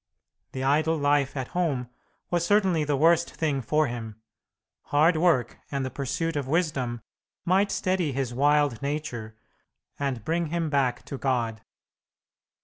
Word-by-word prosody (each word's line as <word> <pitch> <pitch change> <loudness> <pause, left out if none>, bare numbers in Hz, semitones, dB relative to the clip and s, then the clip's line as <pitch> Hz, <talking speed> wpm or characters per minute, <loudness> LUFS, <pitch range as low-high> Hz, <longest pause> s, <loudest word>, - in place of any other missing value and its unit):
The 130 - -3
idle 155 +4 +2
life 145 -1 +1
at 130 -1 -3
home 145 -9 -1 0.4
was 175 -1 +1
certainly 185 -4 +3
the 145 -1 0
worst 165 +3 +3
thing 150 -4 0
for 150 +6 +2
him. 115 -4 -6 0.7
Hard 155 +4 +3
work 155 -8 +2
and 140 -2 -2
the 130 - -4
pursuit 165 +4 -2
of 140 -3 -2
wisdom 135 -7 -1 0.4
might 195 +3 +3
steady 185 -5 0
his 130 -2 -2
wild 145 -1 +2
nature 140 -7 -4 0.6
and 135 -6 -2
bring 165 +1 0
him 165 -1 -2
back 135 -4 0
to 140 - -6
God. 120 -5 -1
145 Hz, 140 wpm, -26 LUFS, 130-165 Hz, 0.7 s, certainly